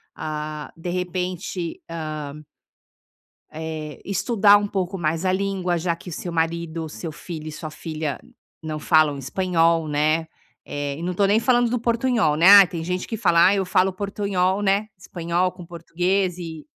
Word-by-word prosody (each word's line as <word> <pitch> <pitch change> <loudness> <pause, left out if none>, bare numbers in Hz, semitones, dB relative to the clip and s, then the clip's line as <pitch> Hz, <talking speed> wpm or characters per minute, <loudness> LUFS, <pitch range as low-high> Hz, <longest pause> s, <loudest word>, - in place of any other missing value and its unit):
ah, 150 -1 -5
de 165 +2 -6
repente, 180 -1 -3
ah 155 -3 -5 1.2
eh, 155 -1 -6
estudar 200 +1 +4
um 205 - -2
pouco 190 -1 -2
mais 160 +1 -1
a 185 - +2
língua 190 -2 -1
já 170 0 -1
que 175 0 -10
seu 175 - -5
marido, 165 0 -2
seu 160 +2 -6
filho 155 -1 -7
e - - -7
sua 155 +1 -7
filha 155 -3 -5 0.4
não 155 -1 -4
falam 150 -2 +3
espanhol, 165 +2 +1
né. 155 +2 +1 0.4
Eh, 145 -1 -4
e - - -7
não 175 - -1
estou 195 +2 +2
nem 210 +3 +3
falando 245 -1 +3
do 245 - -1
portunhol, 235 - +1
né. 170 +4 +5
Ah, - - +1
tem 170 -3 -5
gente 180 +1 -2
que 225 - -3
fala: 170 -6 +4
"Ai 200 +2 +4
eu 190 - 0
falo 185 +1 +2
portunhol, 195 -1 -1
né, 200 +2 +1
espanhol 175 0 -1
com 175 - -11
português 180 +2 -1
e" 165 -3 -7
175 Hz, 170 wpm, -23 LUFS, 160-190 Hz, 1.2 s, né